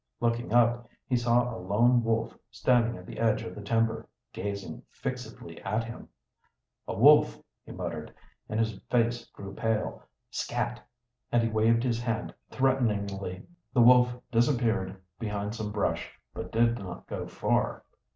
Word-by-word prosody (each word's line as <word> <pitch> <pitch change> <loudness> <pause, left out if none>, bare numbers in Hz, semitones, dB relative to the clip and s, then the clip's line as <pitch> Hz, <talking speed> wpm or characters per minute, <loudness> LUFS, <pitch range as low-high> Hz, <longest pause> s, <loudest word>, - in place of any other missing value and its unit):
Looking 120 0 0
up, 120 0 +3 0.2
he 125 - 0
saw 120 0 +2
a - - -6
lone 120 +6 +3
wolf 115 0 0
standing 115 +1 +2
at 90 - -11
the - - -8
edge 115 -1 +2
of 115 - -6
the 105 - -8
timber, 115 +2 0 0.2
gazing 100 0 -5
fixedly - - -6
at 105 +4 -1
him. 115 +1 -9 0.8
"A - - -3
wolf!" - - +6 0.2
he - - -11
muttered, - - -5 0.4
and 110 - -1
his 110 -3 0
face 120 0 +1
grew 100 0 -10
pale. 110 0 -1 0.3
"Scat!" - - -2 0.5
And 120 -1 +3
he 115 - +1
waved 115 +2 +3
his 120 -2 0
hand 115 -1 -2 0.2
threateningly. 100 -8 0 0.3
The 125 - +5
wolf 125 0 +6
disappeared 115 -6 +1 0.2
behind 105 -2 -3
some 110 -2 -4
brush, 105 -1 -2
but - - -6
did 115 +1 +3
not 90 -3 -8
go - - -5
far. - - 0
115 Hz, 150 wpm, -29 LUFS, 105-120 Hz, 0.8 s, wolf